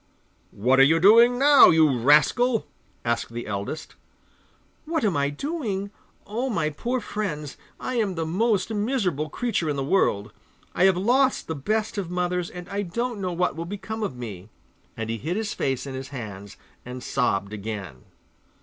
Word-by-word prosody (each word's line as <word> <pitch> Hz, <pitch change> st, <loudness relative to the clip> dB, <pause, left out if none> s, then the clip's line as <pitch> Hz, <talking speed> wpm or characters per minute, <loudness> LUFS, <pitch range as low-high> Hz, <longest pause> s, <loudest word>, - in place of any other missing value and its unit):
'What 125 Hz, +6 st, +2 dB
are -, -, +9 dB
you 160 Hz, +4 st, +4 dB
doing 230 Hz, +6 st, +6 dB
now, 285 Hz, +1 st, +8 dB
you 155 Hz, -4 st, +4 dB
rascal?' 150 Hz, -, +3 dB, 0.4 s
asked 115 Hz, 0 st, -1 dB
the 120 Hz, 0 st, -5 dB
eldest. 105 Hz, +10 st, -5 dB, 0.9 s
'What 320 Hz, -4 st, -1 dB
am 195 Hz, -5 st, +1 dB
I 140 Hz, 0 st, +1 dB
doing? 200 Hz, -, -3 dB, 0.3 s
Oh, 235 Hz, +6 st, -2 dB
my 165 Hz, -9 st, 0 dB
poor 240 Hz, -, -2 dB
friends, 185 Hz, -, -4 dB, 0.2 s
I 255 Hz, -, -3 dB
am 205 Hz, -5 st, 0 dB
the 165 Hz, -1 st, -2 dB
most 205 Hz, +5 st, 0 dB
miserable 205 Hz, -, -1 dB
creature 195 Hz, -5 st, -1 dB
in 145 Hz, -, -1 dB
the 135 Hz, -, -2 dB
world! 120 Hz, -, +1 dB, 0.4 s
I 180 Hz, -, +3 dB
have 190 Hz, -2 st, +4 dB
lost 255 Hz, +7 st, +2 dB
the 160 Hz, -, -3 dB
best 210 Hz, +9 st, -2 dB
of 185 Hz, -4 st, -4 dB
mothers, 180 Hz, 0 st, -1 dB
and 180 Hz, 0 st, -9 dB
I 200 Hz, +1 st, -2 dB
don't 230 Hz, +4 st, -3 dB
know 185 Hz, -1 st, -2 dB
what 180 Hz, +1 st, 0 dB
will 165 Hz, +1 st, -5 dB
become 205 Hz, +4 st, -6 dB
of 195 Hz, -12 st, -3 dB
me,' 105 Hz, -5 st, -8 dB, 0.5 s
and 115 Hz, -1 st, -3 dB
he 115 Hz, 0 st, -3 dB
hid 165 Hz, -, -3 dB
his 220 Hz, -2 st, -2 dB
face 135 Hz, -1 st, -2 dB
in 135 Hz, -, -6 dB
his 130 Hz, 0 st, -6 dB
hands 105 Hz, -7 st, -8 dB, 0.3 s
and 125 Hz, 0 st, -8 dB
sobbed 100 Hz, -6 st, -1 dB
again. 100 Hz, -, -6 dB
175 Hz, 175 wpm, -25 LUFS, 135-215 Hz, 0.9 s, are